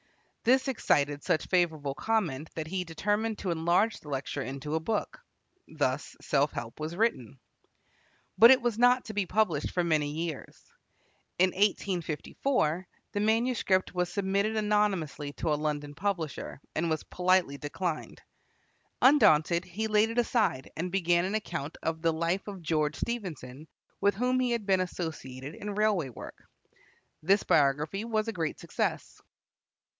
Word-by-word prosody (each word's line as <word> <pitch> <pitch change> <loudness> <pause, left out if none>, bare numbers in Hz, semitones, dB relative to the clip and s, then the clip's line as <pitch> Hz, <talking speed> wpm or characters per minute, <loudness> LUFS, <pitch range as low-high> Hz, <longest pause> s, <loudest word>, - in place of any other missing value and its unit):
This 260 +3 +3
excited 145 - +1
such 155 - +1
favorable 160 -6 +1
comment 160 -4 -1
that 160 - -3
he 180 +3 -2
determined 205 +6 -1
to 185 - -2
enlarge 170 +7 +2
the 150 - -12
lecture 140 +1 -3
into 135 +3 -5
a 160 - +2
book. 210 +6 -2 0.5
Thus - - -2
"Self - - +1
Help" 115 - -6
was 155 +2 -4
written. 155 - 0 1.0
But 230 - +10
it 260 -1 +6
was 235 -2 0
not 245 +1 +4
to 220 - -7
be 200 -3 -1
published 185 -8 +1
for 175 - 0
many 155 -3 +1
years. 160 0 -5 0.8
In 185 +1 +4
1854 185 - 0 0.2
the 205 - -2
manuscript 220 -4 +1
was 180 -1 -1
submitted 200 +2 0
anonymously 195 -9 0
to 155 0 -1
a 150 - -2
London 150 -1 -2
publisher, 170 -5 -3
and 165 +1 0
was 155 -1 -1
politely 180 -6 +1
declined. 160 +2 -4 0.8
Undaunted, 170 - +5
he 200 +5 -4
laid 215 0 +3
it 230 - -5
aside 225 - +1
and 175 +3 -3
began 175 -2 +2
an 195 +3 -2
account 160 -8 -4
of 160 0 -2
the 165 0 +3
life 170 +5 -1
of 195 -4 -7
George 155 -2 0
Stephenson, 160 - -5 0.3
with 200 0 +3
whom 250 +4 +1
he 255 -1 +1
had 235 -3 -1
been 190 -2 +3
associated 155 -6 -5
in 205 +2 -6
railway 205 -9 +1
work. 120 - -10 0.8
This 195 +6 +3
biography 150 +7 +2
was 220 -1 -1
a 225 - -2
great 165 -5 -3
success. - - -3
180 Hz, 150 wpm, -29 LUFS, 155-210 Hz, 1.0 s, But